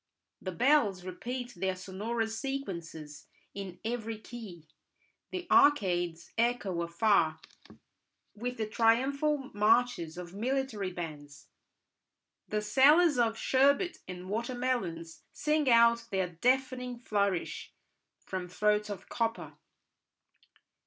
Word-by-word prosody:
The 185 - -4
bells 205 - +3
repeat 245 +7 -5
their 190 +1 -1
sonorous 220 +4 -3
sequences 170 - -6 0.3
in 190 -3 -7
every 225 -1 -3
key; 210 -8 -10 0.6
the 365 -1 -5
arcades 180 - +3
echo 230 -7 +1
afar 170 -2 +2 0.9
with 245 +3 -5
the 220 - -1
triumphal 265 +6 +1
marches 210 -5 +2
of 175 -1 -8
military 230 -3 -2
bands; 150 -5 -8 1.0
the 210 0 -2
sellers 290 +6 +5
of 225 -1 +2
sherbet 280 +9 +2
and 180 0 -7
water 235 +5 -2
melons 180 -11 -3
sing 300 -1 +1
out 235 0 +5
their 190 -3 0
deafening 250 +6 0
flourish 200 -6 -1 0.5
from 185 -2 -4
throats 210 +3 +1
of 200 -3 -7
copper. 230 -1 -2
220 Hz, 105 wpm, -30 LUFS, 180-250 Hz, 1.0 s, sellers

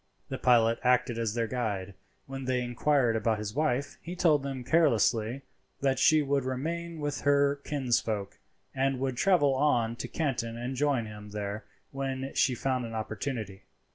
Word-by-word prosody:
The - - -4
pilot 115 -2 +4
acted 125 -1 +2
as 115 -1 -1
their 115 -1 +1
guide. 105 -5 -3 0.3
When 135 -1 -6
they 130 -1 0
inquired 125 0 +2
about 110 0 +1
his 105 0 -5
wife, 140 -2 -1
he 175 +2 -6
told 160 -5 +3
them 135 -2 -5
carelessly 125 -4 +2 0.4
that 135 -1 +1
she 155 +2 +5
would 140 -1 +1
remain 165 +6 -3
with 145 -1 -3
her 140 0 +3
kinsfolk, 115 -7 -1 0.3
and 135 0 0
would 130 -1 -1
travel 145 -3 +3
on 125 -5 +2
to - - -5
Canton 120 -7 -2
and 125 +2 -4
join 135 -3 +1
him 105 -1 -9
there 105 +1 -5 0.3
when 135 -1 -4
she 130 - +2
found 130 0 -1
an 115 -1 -6
opportunity. 110 -2 -4
130 Hz, 165 wpm, -29 LUFS, 115-140 Hz, 0.4 s, she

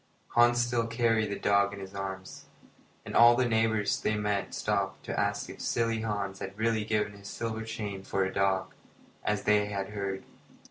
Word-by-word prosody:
Hans 120 0 +4
still 120 -1 +1
carried 115 -2 +1
the 100 - -3
dog 100 0 +2
in - - -9
his 95 0 -8
arms, 95 -1 -6 0.6
and - - -6
all 120 0 +8
the 125 0 +2
neighbours 110 -2 +1
they 110 - +1
met 105 -1 -1
stopped - - -1
to - - -2
ask - - 0
if - - -9
silly 115 -1 0
Hans 100 -3 -3
had 95 +1 -6
really 110 0 +1
given 105 -1 0
his 100 0 -12
silver 110 +1 -4
chain 105 -3 -5
for 95 0 0
a 95 - -4
dog, 95 -1 +1 0.5
as 105 -1 0
they 105 -1 +3
had 100 -2 -3
heard. 100 -2 -4
105 Hz, 185 wpm, -29 LUFS, 100-115 Hz, 0.6 s, all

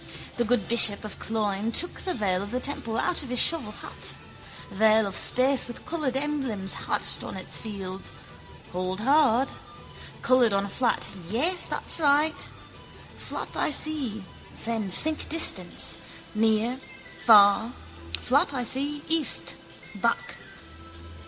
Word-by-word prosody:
The 240 - +1
good 230 -4 0
bishop 220 -3 +5
of 210 - -8
Cloyne 215 -1 -2
took 350 +9 -1
the 370 - -2
veil 190 -5 0
of 200 - -6
the 250 +3 -2
temple 250 -4 -1
out 360 - 0
of 275 - -8
his 250 - -1
shovel 275 -6 +2
hat: - - -7 0.6
veil 220 +2 +4
of 195 -1 -5
space 260 +1 +3
with 240 - -9
coloured 295 -6 -2
emblems 270 -9 -2
hatched - - -2
on - - -7
its - - -4
field. 195 -3 -7 0.6
Hold 185 +2 -3
hard. 270 -1 +3 0.7
Coloured 250 -4 +4
on 195 0 +1
a - - -7
flat: 245 +4 0 0.2
yes, 320 - +2
that's - - -3
right. 300 +1 +2 0.7
Flat - - -6
I - - +1
see, 280 -9 0 0.4
then 225 -3 -2
think 310 - -4
distance, 330 +1 +2 0.3
near, 220 +3 +1 0.4
far, 210 +1 +6 0.5
flat 285 +3 +2
I 250 - -1
see, 285 +5 -1
east, 320 -4 +3 0.4
back. - - -2
240 Hz, 135 wpm, -26 LUFS, 210-285 Hz, 0.7 s, far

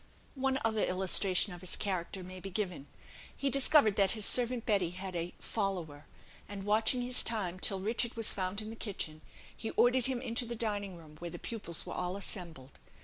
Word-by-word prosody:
One 265 -1 +1
other 220 -1 +2
illustration 185 +1 +3
of 175 - -10
his 185 - -1
character 185 -1 -2
may 185 +1 -8
be 195 - -6
given. 180 -7 -3 0.5
He 275 -1 0
discovered 275 -5 +5
that 195 -2 +4
his 210 - 0
servant 245 -1 +3
Betty 195 -5 +3
had 185 +1 -5
"a 170 +1 -3
follower;" 180 -9 -3 0.4
and, 200 -1 -6
watching 220 +4 +2
his 250 0 +2
time 185 -5 0
till 195 +1 +2
Richard 230 +4 0
was 225 -2 +1
found 190 +2 -1
in 215 - -6
the - - -7
kitchen, 180 -8 -4 0.3
he 225 - -5
ordered 245 0 +3
him 260 -2 -1
into 240 -1 -1
the 235 - -3
dining 205 -4 -2
room, 155 -2 -14
where 175 - -5
the - - -7
pupils 205 -8 -5
were - - -5
all 180 +2 -2
assembled. 170 -9 -6
200 Hz, 195 wpm, -33 LUFS, 180-230 Hz, 0.5 s, discovered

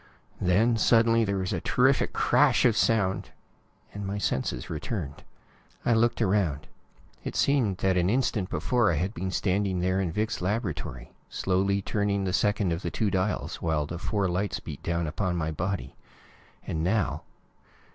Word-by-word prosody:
Then, 110 +6 +3
suddenly, 115 +1 +4
there 100 -2 -1
was 95 -1 -2
a - - -2
terrific - - +2
crash - - +3
of - - +4
sound, 100 -4 +1 0.6
and 100 - -6
my 100 +1 -3
senses 65 -10 -2
returned. 80 - -5 0.6
I 120 - +4
looked 115 +1 +2
around. 95 -8 +1 0.6
It - - -5
seemed 125 -10 +2
that 95 -1 +1
an 90 +1 +2
instant 115 -5 0
before 120 -6 +1
I - - 0
had 95 +7 -1
been 95 0 -3
standing 95 0 0
there 95 +2 +1
in 90 -4 -1
Vic's 110 +4 -2
laboratory, 95 - -3 0.2
slowly 95 +1 0
turning 100 -1 0
the 95 -1 -1
second 105 -4 +1
of 85 - -4
the - - -2
two 105 -3 -1
dials, 95 +2 -1
while 80 -3 0
the 85 +4 -6
four 100 0 0
lights 90 +1 -1
beat 75 -9 -8
down 85 0 -1
upon 90 +4 -2
my 80 -2 -1
body. 90 +5 -3 0.7
And 80 0 -2
now 100 +3 0
95 Hz, 165 wpm, -27 LUFS, 85-105 Hz, 0.7 s, suddenly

